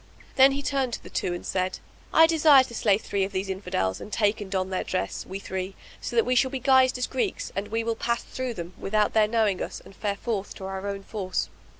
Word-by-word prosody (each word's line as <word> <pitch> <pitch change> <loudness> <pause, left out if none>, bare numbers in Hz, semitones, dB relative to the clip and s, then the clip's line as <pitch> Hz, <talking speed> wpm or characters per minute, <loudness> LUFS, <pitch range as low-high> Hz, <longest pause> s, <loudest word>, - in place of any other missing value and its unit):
Then 270 +1 +7
he 280 +1 -3
turned 270 -4 0
to - - -5
the - - -11
two 180 - -1
and 175 - -8
said, 185 0 -1 0.3
"I 325 - +7
desire 310 -4 +6
to 240 - -10
slay 210 -3 +3
three 200 -2 -2
of 195 - -2
these 195 0 -2
Infidels 180 - -2
and - - -9
take 210 0 +1
and 200 - -6
don 190 -1 -1
their 185 - -1
dress, 185 - -3
we 190 - -5
three; 190 -1 -5 0.3
so 240 - -5
that 230 - +4
we 250 - +1
shall 260 +1 +3
be 265 0 -4
guised 260 0 +4
as 250 - 0
Greeks 260 - -2
and 200 +2 -2
we 225 +2 -1
will 230 0 -1
pass 235 +1 -1
through 255 -2 -4
them, 170 0 -6
with 195 - -4
out 210 -1 +3
their 215 -1 +4
knowing 215 -4 +1
us, - - -4
and 195 - -16
fare 205 -2 -2
forth 210 -4 -3
to 190 - -8
our 190 +1 -4
own 200 -1 -4
force." 195 -3 -3
210 Hz, 255 wpm, -26 LUFS, 190-250 Hz, 0.3 s, Then